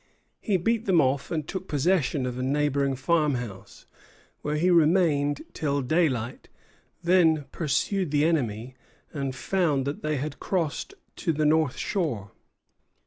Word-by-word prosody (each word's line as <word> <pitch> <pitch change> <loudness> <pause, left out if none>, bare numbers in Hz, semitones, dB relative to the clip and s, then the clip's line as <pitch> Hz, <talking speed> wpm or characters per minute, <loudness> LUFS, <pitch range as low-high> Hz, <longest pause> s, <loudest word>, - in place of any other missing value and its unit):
He 200 -3 +1
beat 225 +5 0
them 185 -4 +4
off, 140 -1 +1
and 155 -3 -3
took 190 0 -5
possession 150 -3 +1
of 125 0 -4
a - - -2
neighboring 140 0 +1
farmhouse, 130 - -2 0.6
where 150 0 -2
he 175 +4 +2
remained 155 -4 +3
till 140 -3 -1
daylight; 130 -5 0 0.5
then 165 -4 +4
pursued 180 +4 0
the 145 +1 +2
enemy, 125 -7 -1 0.4
and 140 -3 -3
found 150 -3 0
that 140 +1 -4
they 155 -1 -1
had 150 +3 -4
crossed 180 - -2 0.2
to 170 - 0
the 155 0 0
north 155 -3 +2
shore. 125 - -2
150 Hz, 140 wpm, -26 LUFS, 135-170 Hz, 0.6 s, them